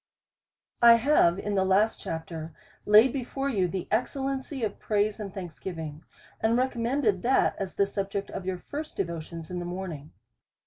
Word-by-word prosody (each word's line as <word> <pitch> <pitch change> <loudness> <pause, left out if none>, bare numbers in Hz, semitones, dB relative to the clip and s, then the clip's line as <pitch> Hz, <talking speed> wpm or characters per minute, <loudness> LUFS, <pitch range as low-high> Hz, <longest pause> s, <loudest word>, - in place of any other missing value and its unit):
1 235 -1 +8
have 230 - +4
in 205 +1 -3
the 190 -1 +3
last 195 +4 +2
chapter 160 -1 -6 0.3
laid 215 +4 +7
before 270 +1 -2
you 195 -8 +1
the 185 0 -4
excel 250 +4 0
lency 270 -2 -2
of 205 - -5
praise 210 0 0
and 205 -2 -5
thanksgiving, 165 -4 -7 0.4
and 225 +2 +2
recommended 240 -4 +1
that 260 +3 +3
as 195 -2 -4
the 200 - +3
subject 195 0 -3
of - - -5
your 185 0 -2
first 300 - -7
devotions 170 -2 -4
in 180 - -3
the - - -4
morn 180 +1 -4
ing. 150 0 -9
200 Hz, 170 wpm, -28 LUFS, 175-235 Hz, 0.4 s, 1